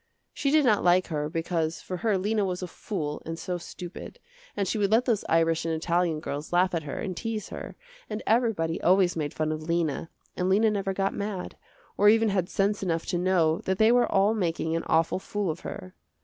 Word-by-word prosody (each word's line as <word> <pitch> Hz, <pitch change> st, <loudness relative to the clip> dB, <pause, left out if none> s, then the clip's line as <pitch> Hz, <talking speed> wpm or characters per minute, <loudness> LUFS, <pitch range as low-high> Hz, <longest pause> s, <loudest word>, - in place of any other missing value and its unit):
She 280 Hz, -, -1 dB
did 300 Hz, 0 st, +4 dB
not 215 Hz, -4 st, +3 dB
like 180 Hz, +1 st, +4 dB
her 150 Hz, -2 st, -2 dB
because 165 Hz, -1 st, -1 dB
for 185 Hz, -, -5 dB
her 215 Hz, 0 st, +1 dB
Lena 210 Hz, +3 st, 0 dB
was 185 Hz, -1 st, -2 dB
a -, -, -3 dB
fool 160 Hz, -4 st, -4 dB
and 165 Hz, 0 st, -5 dB
so 180 Hz, +1 st, -4 dB
stupid, 175 Hz, +1 st, -9 dB, 0.4 s
and 200 Hz, -, 0 dB
she 220 Hz, -, -1 dB
would 200 Hz, -1 st, +2 dB
let 225 Hz, +4 st, +3 dB
those 225 Hz, -5 st, +1 dB
Irish 165 Hz, 0 st, +2 dB
and 165 Hz, -1 st, -1 dB
Italian 170 Hz, 0 st, 0 dB
girls 145 Hz, 0 st, -5 dB
laugh 180 Hz, +1 st, +3 dB
at 165 Hz, -, 0 dB
her 145 Hz, -2 st, -6 dB
and 190 Hz, -4 st, -4 dB
tease 225 Hz, +1 st, -4 dB
her, -, -, -7 dB, 0.3 s
and 215 Hz, 0 st, -4 dB
everybody 215 Hz, -9 st, +1 dB
always 185 Hz, -1 st, +4 dB
made 150 Hz, -3 st, -2 dB
fun 155 Hz, 0 st, -1 dB
of 155 Hz, 0 st, -3 dB
Lena, 165 Hz, -1 st, -1 dB, 0.3 s
and 180 Hz, +1 st, 0 dB
Lena 215 Hz, +3 st, +4 dB
never 195 Hz, -2 st, -1 dB
got 195 Hz, 0 st, 0 dB
mad, 200 Hz, -3 st, -4 dB, 0.4 s
or 205 Hz, +1 st, +6 dB
even 225 Hz, 0 st, +4 dB
had 185 Hz, -2 st, 0 dB
sense 200 Hz, +1 st, 0 dB
enough 165 Hz, -4 st, -1 dB
to 175 Hz, -, -1 dB
know 175 Hz, -3 st, +2 dB
that 190 Hz, 0 st, 0 dB
they 220 Hz, +2 st, +5 dB
were 245 Hz, -1 st, +3 dB
all 200 Hz, +3 st, +4 dB
making 165 Hz, -5 st, -1 dB
an 165 Hz, -, 0 dB
awful 165 Hz, +3 st, +2 dB
fool 200 Hz, -2 st, -2 dB
of 160 Hz, -, -7 dB
her. 90 Hz, 0 st, -8 dB
180 Hz, 220 wpm, -27 LUFS, 165-205 Hz, 0.4 s, or